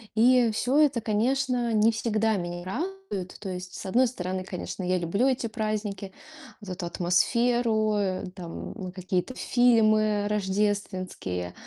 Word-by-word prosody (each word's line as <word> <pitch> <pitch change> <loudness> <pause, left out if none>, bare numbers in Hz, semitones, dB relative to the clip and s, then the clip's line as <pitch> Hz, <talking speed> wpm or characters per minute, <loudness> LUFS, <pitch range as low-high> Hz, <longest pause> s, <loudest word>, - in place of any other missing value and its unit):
И 245 +1 +5
всё 250 +6 +1
это, 285 -6 +3
конечно, 245 +3 +1
не 220 +1 +4
всегда 220 -1 0
меня 175 -1 -4
радует. 315 - -5
То 205 - -7
есть, 180 0 -6
с - - -7
одной 245 +7 +3
стороны, 185 -5 -4
конечно, 185 +1 -6
я 185 +1 +1
люблю 180 +9 +1
эти 260 -2 0
праздники, 215 -3 -3 0.5
вот 200 -3 -8
эту 180 -1 -4
атмосферу, 220 +5 +2
э, 195 -3 -1
там 180 +1 -7
какие-то 185 +4 -2
фильмы 215 -5 +3
рождественские, 190 - -2
210 Hz, 135 wpm, -27 LUFS, 185-235 Hz, 0.5 s, И